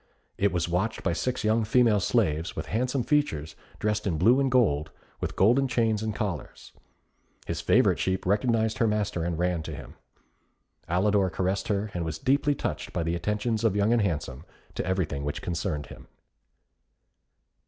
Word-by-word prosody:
It 100 0 +1
was 85 -2 -1
watched 90 +6 -1
by - - +1
six 125 +8 -2
young 110 +1 +2
female 115 -1 +3
slaves, 85 -7 0
with - - -4
handsome 125 +3 -1
features, 80 - 0 0.2
dressed 105 -1 -1
in 85 -5 0
blue 115 - +5
and 135 -1 +2
gold, 90 - +2 0.3
with - - -4
golden 125 +8 +4
chains 115 -3 +1
and 110 -1 -3
collars. 100 - -5 0.7
His - - -3
favourite - - +3
sheep 95 0 -1
recognised 110 +3 +1
her 115 - +3
master 105 -5 -1
and 85 -1 -2
ran 90 -1 0
to 80 - -6
him. - - -10 1.0
Alidor 95 +1 +2
caressed 95 +1 -1
her, 100 0 -1
and 85 - -2
was 80 -1 -4
deeply 140 +2 +2
touched - - -4
by - - -1
the 85 +1 -1
attentions 105 +5 -1
of 110 -4 +2
Young 105 +3 +3
and 120 - +3
Handsome 75 -7 -2 0.3
to - - -3
everything 90 -7 -1
which 75 0 -4
concerned 85 -3 -2
him. - - -13
100 Hz, 170 wpm, -27 LUFS, 85-115 Hz, 1.0 s, blue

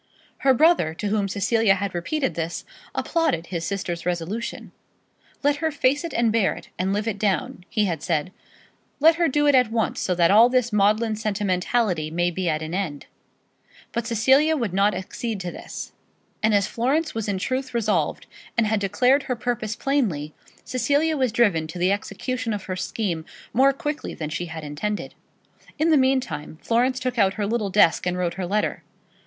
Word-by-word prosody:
Her 265 -1 +4
brother, 300 - +3
to 205 - -3
whom 205 -1 +1
Cecilia 205 +1 +2
had 200 0 -3
repeated 265 - -1
this, 165 0 -4 0.3
applauded 320 - 0
his 170 -2 -4
sister's 180 -4 -3
resolution. 180 +6 -3 0.7
"Let 290 0 +3
her 320 +2 0
face 285 0 +1
it 335 - -4
and 235 -1 +2
bear 220 -3 +2
it, - - -12
and 185 +1 0
live 210 +2 -1
it 205 -3 -2
down," 190 -3 -1
he 215 -2 +1
had 170 -6 -2
said. 165 +1 -1 0.7
"Let 325 +3 +6
her 340 -1 +3
do 295 +2 +1
it 290 - +5
at 250 -3 +4
once, 225 -1 0
so 180 - 0
that 170 0 +4
all 225 +4 +7
this 250 -2 +1
maudlin 215 +2 +2
sentimentality 200 -4 0
may 175 +2 0
be 180 0 -1
at 155 0 -1
an 155 +2 -5
end." 175 -7 -3 0.9
But 235 0 -3
Cecilia 265 +7 +4
would 230 -9 -2
not 200 +2 +3
accede 220 +3 -4
to 180 -1 -4
this, - - -8 0.5
and 215 -1 +3
as 200 -1 +3
Florence 280 - 0
was 225 -2 -3
in 200 -2 -1
truth 260 +4 -3
resolved, 205 -9 0 0.3
and 230 - +4
had 215 0 +1
declared 250 +8 +3
her 250 - +1
purpose 230 -2 -2
plainly, 205 - -1 0.3
Cecilia 285 +6 +1
was 260 -5 +1
driven 200 -9 +2
to 160 - -8
the 180 +2 +2
execution 225 +4 -2
of 205 -2 -4
her 185 - -4
scheme 185 -3 -2 0.3
more 265 +4 +5
quickly 295 +1 -4
than 155 -2 -5
she 175 +3 -3
had 160 -1 -7
intended. 175 +9 -4 0.6
In 315 +2 +2
the - - +6
meantime, 260 - 0
Florence 250 +3 +1
took 250 -1 -2
out 195 -1 +3
her 210 - -1
little 215 -1 -1
desk 185 -3 +4
and 180 0 -1
wrote 175 -1 -1
her 185 -2 -4
letter. 210 +3 -1
210 Hz, 185 wpm, -24 LUFS, 180-255 Hz, 0.9 s, all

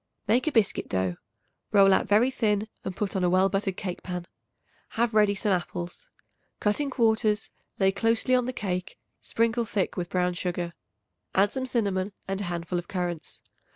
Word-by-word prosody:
Make 240 +7 +3
a - - +3
biscuit 225 -7 +1
dough; 95 -2 0 0.5
roll 195 -2 +6
out - - +2
very 225 +6 +4
thin 210 -4 +1 0.2
and 190 - -4
put 200 -3 -2
on 190 - +1
a 180 - +3
well 185 +2 +4
buttered 195 -1 -1
cake 180 -2 -4
pan. 180 -1 -5 0.7
Have 235 0 +2
ready 210 -1 +4
some 205 +1 0
apples. 180 - -3 0.5
Cut 210 +3 +1
in 285 - -1
quarters; 220 -4 +2 0.3
lay 190 -1 +4
closely 230 +5 +1
on 250 -1 +3
the - - 0
cake; 185 -7 -3 0.2
sprinkle 230 +1 +1
thick 205 -3 -1
with 175 -1 -2
brown 180 -1 +1
sugar; 175 -1 -3 0.6
add 200 +2 +4
some 260 -1 -3
cinnamon 200 -5 0
and 195 +1 -2
a - - -2
handful 175 0 -2
of 175 - -8
currants. 175 -5 -3
200 Hz, 180 wpm, -27 LUFS, 180-225 Hz, 0.7 s, roll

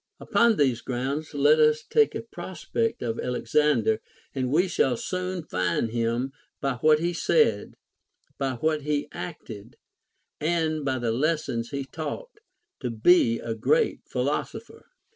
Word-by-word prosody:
Upon 235 -1 +3
these 130 -5 +2
grounds 140 +5 -3
let 145 +2 +5
us 155 0 +4
take 445 - +2
a - - -4
prospect 190 - -3
of 115 -1 -2
Alexander, 125 -2 +1 0.3
and 130 -2 -2
we 175 +6 +3
shall 130 -8 +1
soon 185 +2 -3
find 90 - -1
him, 120 +3 -1 0.3
by 135 -3 -1
what 155 +4 +5
he 170 +3 -1
said, 150 -10 +2 0.6
by 135 -2 -1
\vhat 155 +4 0
he 145 0 -1
acted, 115 - -8 0.6
and 155 -1 0
by 135 -1 0
the 120 -2 -1
lessons 130 -3 -1
he 140 -1 -4
taught, 430 - -6 0.4
to 125 - -3
be 115 +1 +4
a 115 - -4
great 460 - +1
philosopher. - - -3
145 Hz, 140 wpm, -26 LUFS, 120-160 Hz, 0.6 s, let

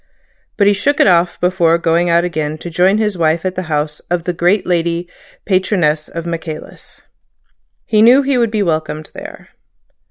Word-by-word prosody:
But 200 - +3
he 205 - +5
shook 285 +8 0
it - - +5
off 175 -2 +2
before 175 -2 +2
going 170 +1 +1
out 170 0 +3
again 155 -3 -3
to 170 +2 -8
join 185 +4 +3
his 210 -4 -1
wife 160 +2 +1
at 185 - -1
the 185 - -4
house 150 0 -2
of 175 -1 -1
the 180 - -2
great 180 +4 +1
lady 170 0 -1 0.4
patroness 180 -6 0
of 170 0 -7
Michaelis. 165 -2 -8 0.8
He 215 -1 +2
knew 250 +5 +6
he 270 -2 +1
would 235 -2 +2
be 215 -1 -1
welcomed 155 -3 -3
there. - - -11
175 Hz, 180 wpm, -16 LUFS, 165-195 Hz, 0.8 s, knew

